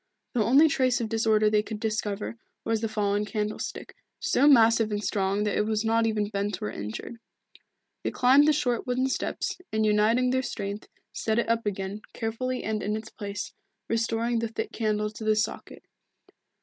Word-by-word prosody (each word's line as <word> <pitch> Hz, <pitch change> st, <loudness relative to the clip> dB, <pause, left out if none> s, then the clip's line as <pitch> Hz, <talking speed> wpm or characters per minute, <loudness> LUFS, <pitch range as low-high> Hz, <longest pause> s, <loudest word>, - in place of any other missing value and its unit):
The 230 Hz, -, +2 dB
only 275 Hz, +9 st, +6 dB
trace 260 Hz, -3 st, +2 dB
of 230 Hz, -2 st, -2 dB
disorder 220 Hz, -1 st, +3 dB
they 210 Hz, 0 st, +3 dB
could 215 Hz, 0 st, -6 dB
discover 215 Hz, -1 st, -2 dB, 0.3 s
was 225 Hz, -1 st, 0 dB
the 225 Hz, -, -1 dB
fallen 205 Hz, -1 st, 0 dB
candlestick, 210 Hz, 0 st, -4 dB, 0.3 s
so 280 Hz, -, +3 dB
massive 230 Hz, -5 st, +6 dB
and 205 Hz, 0 st, -2 dB
strong 200 Hz, 0 st, 0 dB
that 210 Hz, -, 0 dB
it 210 Hz, -, +1 dB
was 215 Hz, 0 st, 0 dB
not 225 Hz, 0 st, +3 dB
even 215 Hz, -2 st, 0 dB
bent 200 Hz, -1 st, -2 dB
or 105 Hz, -, -3 dB
injured. 105 Hz, -, -6 dB, 0.9 s
They -, -, 0 dB
climbed 270 Hz, +4 st, +5 dB
the -, -, +6 dB
short 250 Hz, -4 st, -1 dB
wooden 255 Hz, +1 st, +1 dB
steps, -, -, -2 dB
and 220 Hz, 0 st, +1 dB
uniting 220 Hz, +4 st, +3 dB
their 260 Hz, 0 st, +2 dB
strength, 200 Hz, -4 st, -5 dB, 0.3 s
set 220 Hz, 0 st, -1 dB
it 235 Hz, -, +1 dB
up 230 Hz, -1 st, 0 dB
again, 195 Hz, +1 st, -3 dB
carefully 250 Hz, +3 st, -3 dB
and 215 Hz, -1 st, -2 dB
in 210 Hz, +1 st, -1 dB
its 220 Hz, 0 st, -9 dB
place, 200 Hz, -1 st, -6 dB, 0.3 s
restoring 230 Hz, +1 st, 0 dB
the 230 Hz, -, -1 dB
thick 225 Hz, -, -4 dB
candle 210 Hz, -1 st, -1 dB
to 220 Hz, -, -9 dB
the 215 Hz, 0 st, +3 dB
socket. 215 Hz, -, -3 dB
220 Hz, 180 wpm, -27 LUFS, 210-230 Hz, 0.9 s, only